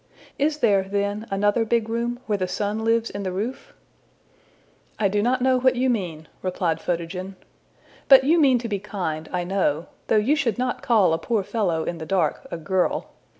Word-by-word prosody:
Is 295 +2 +1
there, 205 -8 +3
then, 205 +2 -2
another 205 +3 +2
big 225 0 0
room, 235 +1 -2
where 210 -2 -1
the 185 - -1
sun 210 +3 -2
lives 230 0 +1
in 200 - -5
the 190 -2 -3
roof?'' 235 - -4 1.3
``I 200 -3 +2
do 205 0 +1
not 250 +3 +1
know 260 -1 +3
what 260 0 +3
you 255 +1 +2
mean,'' 170 -8 -3
replied 175 -3 -1
Photogen. 180 +2 -4 0.7
``But 265 -1 +9
you 320 +5 +4
mean 265 -4 +5
to 235 0 -4
be 205 -3 -2
kind, 160 -6 -4
I 180 -1 -1
know, 175 -4 0 0.2
though - - +2
you 240 +8 +3
should 260 -7 0
not 250 +1 -2
call 210 -8 +3
a 165 - 0
poor 215 +3 -1
fellow 185 -7 -1
in 170 +1 -4
the 160 - -7
dark 190 - 0
a - - -4
girl. 180 +3 -1
205 Hz, 195 wpm, -24 LUFS, 185-240 Hz, 1.3 s, ``But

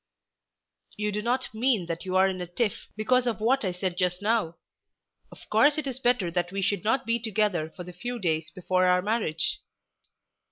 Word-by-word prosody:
"You 210 0 -1
do 210 +1 -2
not 245 +1 -1
mean 225 -4 +2
that 170 +1 -5
you're 185 0 +3
in 190 -1 -1
a 180 - -4
tiff 205 +5 -2
because 250 +4 +2
of 225 -3 -1
what 250 +5 +2
I 185 - 0
said 180 0 -3
just 180 -1 +1
now. 205 -5 0 0.8
Of - - -15
course 295 +1 +5
it 305 - -2
is 260 -2 -4
better 240 -9 +1
that 175 0 -1
we 195 0 -2
should 200 0 0
not 225 +5 +1
be 230 +1 +1
together 210 -7 0
for 180 - -9
the 180 0 -10
few 245 +7 -5
days 160 -6 -1
before 185 +2 +1
our 180 0 +3
marriage." 205 -7 0
200 Hz, 195 wpm, -27 LUFS, 180-235 Hz, 0.8 s, course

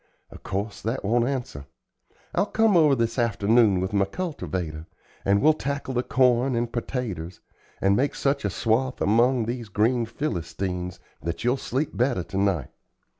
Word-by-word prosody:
Of - - -12
course 100 +2 -4
that 115 +1 -3
won't 120 +3 +2
answer. 120 - -4 0.7
I'll 200 - +1
come 220 -2 +3
over 155 -5 +5
this 115 +1 -1
afternoon 110 -2 +3
with 95 +2 -2
my 100 -1 +3
cultivator, 90 - -4 0.4
and 100 +3 +2
we'll 155 +1 +6
tackle 140 -2 -3
the 125 - +1
corn 125 0 +2
and 115 0 -1
pertaters, 105 -9 -4 0.4
and 100 +1 +3
make 140 +6 +1
such 140 +1 0
a 100 - 0
swath 115 +6 0
among 120 +3 +3
these 120 -1 -4
green 115 +3 +1
Philistines 90 - -3 0.2
that 85 +3 -4
you'll 125 +3 +2
sleep 135 +3 -2
better 120 -6 +1
to 95 - -6
night. 95 -9 0
115 Hz, 160 wpm, -25 LUFS, 95-130 Hz, 0.7 s, we'll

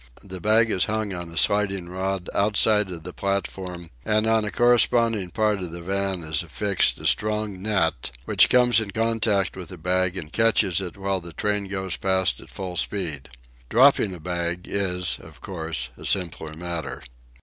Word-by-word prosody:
The 95 -2 -8
bag 110 +2 +4
is 90 - +2
hung 110 -2 -2
on 90 -2 -6
a 85 - -9
sliding 100 0 +1
rod 95 +1 -3
outside 105 0 +2
of 85 -3 -7
the - - -8
platform, 95 -3 -4
and 110 0 +2
on 110 -1 +3
a 105 - -2
corresponding 115 -4 +3
part 105 +2 0
of 90 -2 -4
the 85 +1 -7
van 95 -1 -1
is 80 +1 -1
affixed 95 +4 +1
a - - -10
strong 105 -3 +1
net, 95 - 0 0.2
which - - +4
comes 125 -2 +5
in 110 -2 -4
contact 110 -3 0
with 95 -2 -8
the 95 - -9
bag 90 +2 0
and 80 -3 -5
catches 105 -5 +3
it 90 0 -6
while 95 -1 -1
the 85 -1 -9
train 105 +1 -1
goes 95 -2 -3
past 95 -1 +1
at - - -15
full 90 -2 -6
speed. 80 -9 -2 0.4
Dropping 120 -6 +4
a - - -11
bag 85 +1 -3
is, 90 -3 -1
of - - -15
course, 80 -7 -3
a - - -13
simpler 85 -5 -1
matter. 85 0 -5
95 Hz, 180 wpm, -24 LUFS, 90-105 Hz, 0.4 s, comes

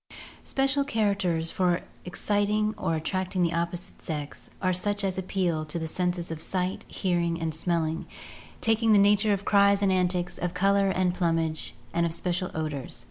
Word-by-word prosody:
Special 275 +1 +1
characters 200 -10 0
for 180 -2 +1 0.2
exciting 205 +4 +1
or 165 - -1
attracting 185 +3 -1
the 170 0 +1
opposite 170 +1 -3
sex 150 -3 -5
are 185 -1 +1
such 205 +3 0
as 190 -1 -1
appeal 180 -4 -1
to 155 +2 -4
the 160 -1 -3
senses 175 0 -2
of 160 -1 -5
sight, 185 +1 -2
hearing, 170 -2 0
and 165 -1 -2
smelling, 160 0 -1 0.5
taking 225 0 +3
the - - +7
nature 205 +1 +4
of 200 0 -1
cries 200 0 +4
and 195 - +3
antics, 180 -1 0
of 175 0 -2
color 195 +1 +3
and 185 -1 +1
plumage, 165 -3 -1 0.2
and 170 0 +2
of 165 - -1
special 180 +1 -1
odors. 155 -4 -4
180 Hz, 165 wpm, -27 LUFS, 170-200 Hz, 0.5 s, the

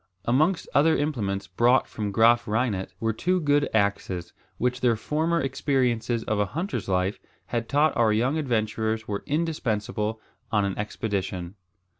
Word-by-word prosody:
Amongst 155 +9 +2
other 160 +3 +4
implements 105 -10 -1
brought 120 +8 +3
from 105 -2 -4
Graaf 115 +3 +4
Reinet 105 -3 -1
were 115 0 0
two 180 +11 +1
good 145 -2 +2
axes, 100 -4 -1 0.2
which 125 +1 -1
their 120 -2 +3
former 160 +8 0
experiences 125 -4 0
of 110 -1 -1
a 105 - +2
hunter's 155 - -3
life 95 +2 0 0.3
had 115 -1 -3
taught 145 +1 +3
our 115 -2 +3
young 125 +8 +1
adventurers 110 -4 -1
were 100 -1 -3
indispensable 110 -9 -1 0.3
on 105 -2 +2
an 100 - -2
expedition. 100 -4 -3
115 Hz, 145 wpm, -26 LUFS, 105-140 Hz, 0.3 s, other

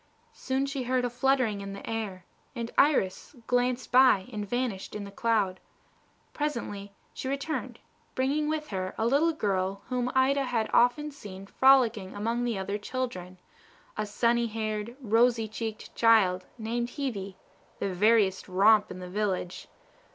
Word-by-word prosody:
Soon 270 - -1
she 275 -1 -3
heard 250 0 0
a 245 - -2
fluttering 245 -5 +1
in 195 0 -6
the 200 - -9
air, 210 -5 -4 0.3
and 235 -1 -4
Iris 270 -5 +2
glanced 245 +1 0
by 250 -7 +5
and 205 -2 -4
vanished 245 -6 -2
in 210 - -4
the 200 - -9
cloud. 205 -4 0 0.7
Presently 230 -9 -4 0.2
she - - -6
returned, 280 +3 -3 0.4
bringing 290 +4 0
with 310 -1 -3
her 185 -2 -4
a 220 - 0
little 285 +7 +3
girl 195 -7 -1
whom 250 0 -1
Ida 270 +1 +3
had 230 -3 -1
often 270 +5 +3
seen 195 -8 -10
frolicking 235 -5 +3
among 230 +4 -1
the 235 -4 -1
other 200 +2 -3
children, 200 -6 -5 0.6
a 215 0 -2
sunny 235 +3 +1
haired, 215 +1 -4
rosy 230 0 +3
cheeked 220 0 -6
child, 195 -6 +3
named 235 +1 -2
Hebe, 200 -9 -3 0.4
the 195 - -2
veriest 205 0 +3
romp 205 +3 +4
in 185 - -7
the 180 0 -7
village. 185 -2 -3
225 Hz, 150 wpm, -28 LUFS, 200-255 Hz, 0.7 s, by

